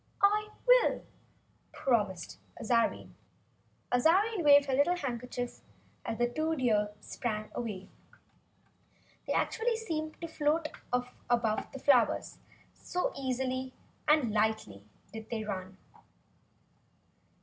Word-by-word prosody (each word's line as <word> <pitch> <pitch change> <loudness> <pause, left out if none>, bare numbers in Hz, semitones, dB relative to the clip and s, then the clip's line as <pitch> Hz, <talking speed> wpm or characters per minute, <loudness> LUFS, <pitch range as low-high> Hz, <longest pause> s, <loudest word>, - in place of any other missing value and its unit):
"I 420 +1 +4 0.2
will," - - +5 0.7
promised 205 - -1 0.2
Azarine, 230 0 +1 0.8
waving 325 - +5
her 275 -1 -2
little 285 +7 +4
red - - -7
handkerchief 245 -1 -4 0.4
as 225 - -3
the 240 - +2
two 315 +6 -1
deer 215 -6 +2
sprang 215 -3 -4
away. 205 -5 -5 1.4
They - - 0
actually 460 +1 +1
seemed 315 -8 -4
to 335 - -5
float 310 0 0 0.2
off 250 0 -1 0.2
above 230 -3 +1
the - - -7
flowers, 255 -4 +2 0.3
so 360 - -2
lightly 260 -1 -2 0.3
and 295 -8 +4
easily 210 - 0 0.3
did 220 -1 -8
they 225 -2 -2
run. 190 -2 -5
250 Hz, 105 wpm, -31 LUFS, 220-310 Hz, 1.4 s, will